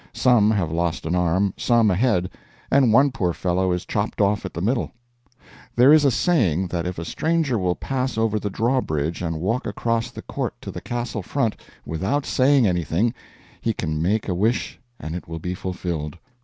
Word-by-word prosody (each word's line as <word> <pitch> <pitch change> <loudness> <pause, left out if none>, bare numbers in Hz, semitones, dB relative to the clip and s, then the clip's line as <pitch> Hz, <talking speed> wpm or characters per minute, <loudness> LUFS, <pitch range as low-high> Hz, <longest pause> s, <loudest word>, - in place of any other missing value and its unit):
Some 120 -5 +4
have 95 -8 0
lost 85 -1 -1
an 80 - -1
arm, 90 +2 +1
some 115 -4 +3
a - - +2
head, 100 -5 +1 0.4
and 135 -4 +5
one 135 +5 +5
poor 90 -10 -1
fellow 90 +1 0
is 90 0 -2
chopped 105 +1 -2
off 100 0 +2
at 95 - -6
the - - -3
middle. 115 +7 0 0.9
There 130 +5 +7
is 155 -2 +5
a - - +6
saying 110 - +1
that 85 0 -2
if 90 - -4
a 85 - -5
stranger 155 - 0
will 90 -1 0
pass 130 +4 -2
over 110 -1 +1
the 105 - -3
drawbridge 95 - -1
and 80 -2 -2
walk 115 - -1
across 115 0 -1
the 120 - -10
court - - -4
to - - -6
the - - -7
castle 120 -3 -3
front 115 +3 -1 0.3
without 95 - -1
saying 135 -1 +3
anything, 90 +5 +1 0.5
he 115 - 0
can 80 -5 -3
make 105 +6 0
a 95 - 0
wish 110 +7 0 0.2
and 80 +2 -5
it 90 - -7
will 80 0 -5
be 90 +3 -4
fulfilled. 85 -4 -4
100 Hz, 195 wpm, -23 LUFS, 90-120 Hz, 0.9 s, There